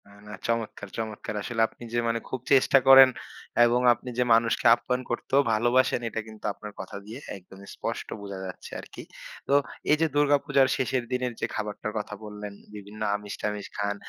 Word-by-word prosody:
না, - - -18 0.2
না। - - -9 0.2
চমৎকার, 115 -3 -3
চমৎকার। 110 -1 -4
আসলে 115 +2 -2
আপনি - - -15
যে 120 - +2
মানে 115 0 0
খুব 130 - -3
চেষ্টা 135 0 +5
করেন 135 0 +10 0.6
এবং 120 +1 +3
আপনি 125 - -9
যে 125 - +3
মানুষকে 115 0 +2
আপ্যায়ন 125 +1 -2
করতেও 135 +3 +2
ভালোবাসেন, 120 +4 +3
এটা 110 - -3
কিন্তু 110 -1 -12
আপনার 105 +1 -9
কথা 95 +1 -7
দিয়ে 110 +5 -8 0.2
একদমই 95 +1 -15
স্পষ্ট - - -4
বোঝা 100 -1 -7
যাচ্ছে 95 - -9
আরকি। - - -10 0.4
তো - - +1 0.4
এইযে 155 +2 +4
দুর্গা 145 0 +4
পূজার 135 -1 +4
শেষের 130 -1 0
দিনের 125 -1 -1
যে - - 0
খাবারটার 105 0 -4
কথা 105 0 -4
বললেন, 105 -1 -7 0.2
বিভিন্ন 105 +1 -10
আমিষ-টামিষ 105 0 -4
খান। 100 0 -1
115 Hz, 175 wpm, -27 LUFS, 105-125 Hz, 0.6 s, করেন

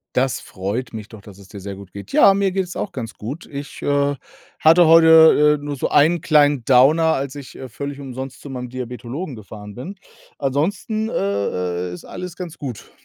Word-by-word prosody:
Das 130 -2 +1
freut 105 +6 -5
mich 110 -2 -8
doch, 110 -3 -13
dass 100 -1 -14
es 100 -1 -15
dir 100 0 -10
sehr 100 +1 -6
gut 95 -1 -13
geht. 100 -1 -10
Ja, 195 - +6
mir 195 -1 +1
geht's 185 -2 -3
auch - - -4
ganz 120 -4 -6
gut. 135 +11 -7
Ich, 140 0 -8
äh, 145 0 +1 0.5
hatte 165 +2 +6
heute, 160 -2 +7
äh, - - -10
nur 145 0 -3
so - - -1
einen 160 +4 +3
kleinen 145 -5 +3
Downer, 150 +6 +5
als 135 0 -3
ich, 140 -3 -10
äh, 130 -1 -9
völlig 140 +5 -6
umsonst 130 -1 -7
zu 145 - -9
meinem 125 -1 -5
Diabetologen 125 +4 -6
gefahren 105 -1 -11
bin. 160 - -7 0.4
Ansonsten, 190 - -1
äh, 90 - -2
äh, - - -5
ist - - -11
alles 180 -1 -8
ganz 175 -4 -8
gut. 125 -7 -7
135 Hz, 200 wpm, -20 LUFS, 110-160 Hz, 0.5 s, heute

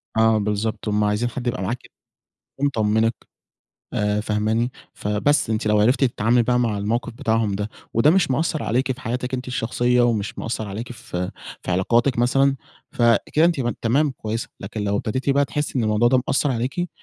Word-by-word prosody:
آه 110 0 +4
بالضبط. 105 +1 -2
هُم 105 0 +1
عايزين 105 +3 +1
حد 125 0 -5
يبقى 100 -5 -1
معاكِ، 120 +7 -4 0.7
ومطمنِك، 115 -4 +1 0.8
آآ 105 0 0
فاهماني 110 +3 0 0.2
فبس، 105 +6 +1
أنتِ 110 -1 0
لو 105 0 +3
عرفتِ 125 +7 +3
تتعاملي 120 -1 +2
بقى 125 +1 +2
مع 115 -4 0
الموقف 110 +4 -2
بتاعهم 110 -2 0
ده، 105 +2 -3 0.2
وده 125 +7 +4
مش 170 -7 +3
مأثّر 155 +2 0
عليكِ 130 +3 0
في 130 - -6
حياتِك 125 +3 -3
أنتِ 130 0 -3
الشخصية، 125 0 +1
ومش 110 -3 0
مأثّر 110 -2 -3
عليكِ 110 +5 -6
في 90 -6 -5 0.3
في - - -4
علاقاتِك 120 +8 +2
مثلًا، 135 +3 +3 0.4
فكده 120 +7 +3
أنتِ 170 -5 +2
م 120 -2 0
تمام 135 +6 +1
كويسة، 110 -2 -4
لكن 110 - -5
لو 100 0 0
ابتديتِ 130 +7 -2
بقى، 140 +1 +3
تحسي 150 -3 -2
إن 115 - +1
الموضوع 110 +2 +3
ده 125 0 +3
مأثّر 140 +1 +2
عليكِ، 130 +9 -2
115 Hz, 175 wpm, -22 LUFS, 105-130 Hz, 0.8 s, آه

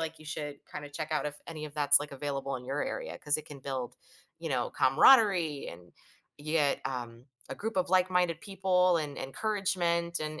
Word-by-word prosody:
like 160 0 -4
you 155 - -14
should 150 -1 -5
kinda 145 - -7
check 155 +2 -5
out 155 - 0
if 145 - -4
any 155 -2 -6
of 145 - -13
that's, 145 -1 +6
like, 145 - -6
available 140 -1 -3
in 125 - -10
your 140 +3 -2
area - - -4
'cause 150 0 +3
it 155 - -8
can 145 -2 -10
build, 130 -2 -4 0.4
you - - -5
know, - - -1
camaraderie 170 - +4
and 85 0 -12 0.5
yet, 150 -1 +1
um, 120 -1 -5 0.2
a - - -3
group 220 -1 -5
of 180 -2 0
like-minded 180 -3 +2
people 185 -2 +2
and 150 -3 -3
encouragement 170 0 -1
and 155 0 -4
155 Hz, 190 wpm, -30 LUFS, 140-180 Hz, 0.5 s, that's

